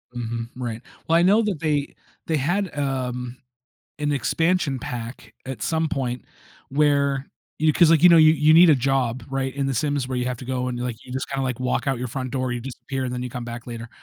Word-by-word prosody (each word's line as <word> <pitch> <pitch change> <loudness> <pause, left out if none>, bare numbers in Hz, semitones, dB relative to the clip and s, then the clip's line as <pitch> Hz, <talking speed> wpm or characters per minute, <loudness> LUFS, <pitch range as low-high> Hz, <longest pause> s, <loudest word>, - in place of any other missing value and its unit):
Mhm, 115 -1 -4
right, 120 -3 -5 0.3
well, 165 - +4
I - - +4
know 200 +5 +5
that 205 -7 -2
they 150 -3 -1 0.3
they 160 - +1
had, 175 +7 -1
um 125 -3 -3 0.6
an 150 0 0
expansion 160 +1 +1
pack 115 -2 -7
at 130 -1 -6
some 160 0 0
point 125 -4 -2 0.5
where 140 -1 +2 0.3
you 155 0 +3
'cause, 165 +1 +5
like, 165 -2 +4
you - - +11
know, 170 - +8
you 155 0 +7
you 150 0 +4
need 170 +2 +8
a - - +7
job, 130 -2 0
right, 135 -1 -2
in 140 0 -1
The 135 - -1
Sims 145 +1 0
where 130 -1 -3
you 125 - -1
have 125 0 -2
to 130 - -8
go 125 0 -2
and, 125 -1 -4
like, 125 -1 -3
you, - - -13
just, 130 0 -3
kinda, 135 -1 -1
like, 125 -3 -2
walk 125 +2 -1
out 135 -3 0
your 125 - -3
front 130 +1 -4
door, 130 -1 -1
you 120 - -3
disappear 130 +1 -5
and 125 - -3
then 125 - -3
you 125 - -5
come 125 0 -5
back 120 0 -7
later. 120 -1 -7
135 Hz, 235 wpm, -23 LUFS, 125-150 Hz, 0.6 s, you